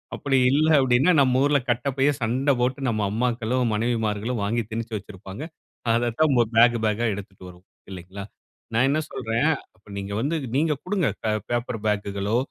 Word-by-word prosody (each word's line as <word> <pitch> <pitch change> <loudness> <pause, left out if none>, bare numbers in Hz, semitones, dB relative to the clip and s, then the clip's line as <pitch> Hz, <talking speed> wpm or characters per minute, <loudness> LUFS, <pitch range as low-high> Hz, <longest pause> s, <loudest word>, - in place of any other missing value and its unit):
அப்படி 135 -2 0
இல்லனா, 155 +3 +3
அப்படினா 130 +6 +3
நம்ப 130 -1 +3
ஊரில் 140 -3 +1
கட்டைப்பையை 135 +4 +1
சண்டை 130 +5 +1
போட்டு 130 +3 0
நம்ப 110 -3 0
அம்மாக்களோ 120 +1 -1 0.2
மனைவிமார்களோ 110 0 -1
வாங்கி 115 +3 0
திணிச்சி 115 0 -4
வச்சிருப்பாங்க. 100 +4 -9 0.5
அத 120 0 +1
தான் 155 -4 +4 0.2
பேக் 120 +1 +6
பேக்கா 110 +2 0
எடுத்துட்டு 95 -1 -9
வருவோம், 90 +1 -17 0.2
இல்லங்களா. 95 +2 -8 0.5
நான் 125 +4 +3
என்ன 155 +2 +1
சொல்லுறேன். 125 +1 -1 0.3
அப்ப 100 +3 -30
நீங்க 100 0 -5
வந்து 150 +5 -1 0.2
நீங்க 155 +1 +2
குடுங்க 180 -5 0 0.4
பேப்பர் 120 -1 -2
பேக்குகளோ, 100 +1 -1
120 Hz, 150 wpm, -24 LUFS, 105-135 Hz, 0.5 s, பேக்